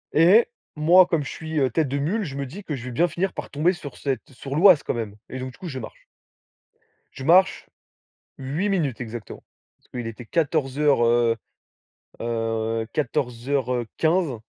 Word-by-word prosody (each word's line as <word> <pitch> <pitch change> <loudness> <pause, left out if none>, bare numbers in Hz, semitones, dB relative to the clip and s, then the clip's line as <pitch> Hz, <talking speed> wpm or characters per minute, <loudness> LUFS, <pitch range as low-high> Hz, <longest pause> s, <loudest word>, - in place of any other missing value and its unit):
Et 180 +9 +6 0.3
moi 170 +5 +6
comme 165 -4 0
je - - -6
suis, 160 -1 -4
heu, 135 -2 +3
tête 150 +5 +1
de 135 +2 -2
mule, 180 +11 0
je 140 -7 -6
me 140 0 -3
dis 175 +11 -9
que 150 - -3
je 125 - -8
vais 125 - -5
bien 165 +9 +2
finir 185 +3 -2
par - - -6
tomber 155 +5 +2
sur 150 -6 -9
cette 135 -2 -3
sur 135 +2 -6
l'Oise 180 -1 +6
quand - - -1
même. 110 -4 -4
Et 130 - -6
donc 130 0 -6
du - - -18
coup, 180 - -7
je 130 -3 -5
marche. 115 - -10 1.1
Je 135 - -9
marche 185 +4 +4 0.7
8 145 +10 -2
minutes 150 - -1
exactement. 115 -2 -7 0.3
Parce - - -33
qu'il 120 -2 -5
était 115 +2 -8
14:00, 145 -2 +1
heu 115 0 +3 0.9
heu, 115 -1 -1
14:15 135 +2 -1
140 Hz, 180 wpm, -24 LUFS, 120-165 Hz, 1.1 s, Et